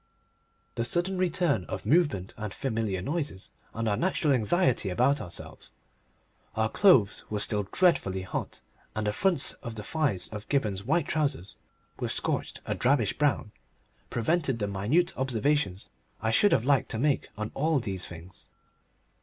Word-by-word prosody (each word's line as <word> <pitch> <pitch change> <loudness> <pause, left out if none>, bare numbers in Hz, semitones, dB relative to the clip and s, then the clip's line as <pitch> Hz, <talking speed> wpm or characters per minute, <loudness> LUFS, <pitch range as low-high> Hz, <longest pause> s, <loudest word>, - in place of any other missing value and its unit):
The 115 - -1
sudden 175 +8 0
return 175 - +1
of - - -6
movement 135 - +2
and 105 -2 -5
familiar 110 -6 -2
noises, 145 - -3 0.2
and 115 0 -3
our 105 - +2
natural 155 - +1
anxiety 130 - +2
about 130 +9 +2
ourselves 85 - -7 0.8
(our 110 0 +1
clothe's 125 - +4
were 105 - -2
still 105 -1 -1
dreadfully 95 - +2
hot, 95 - -5 0.3
and 110 -1 -1
the 105 - 0
fronts 175 - +1
of 115 -1 -6
the 105 - -5
thighs 120 - -1
of 105 -1 -8
Gibberne's 105 -9 0
white 155 +3 +1
trousers 145 - -1 0.4
were - - -2
scorched - - -2
a - - -1
drabbish 120 -4 +2
brown), 140 -7 +1 0.6
prevented 135 +1 0
the 105 - -1
minute 105 - +1
observations 130 -5 0 0.3
I 110 - 0
should 205 - +5
have 115 - +3
liked 140 -1 +3
to - - -2
make 140 +3 +1
on 110 0 -4
all 155 +2 +1
these 95 -6 -2
things. 85 +2 -11
120 Hz, 155 wpm, -28 LUFS, 105-150 Hz, 0.8 s, should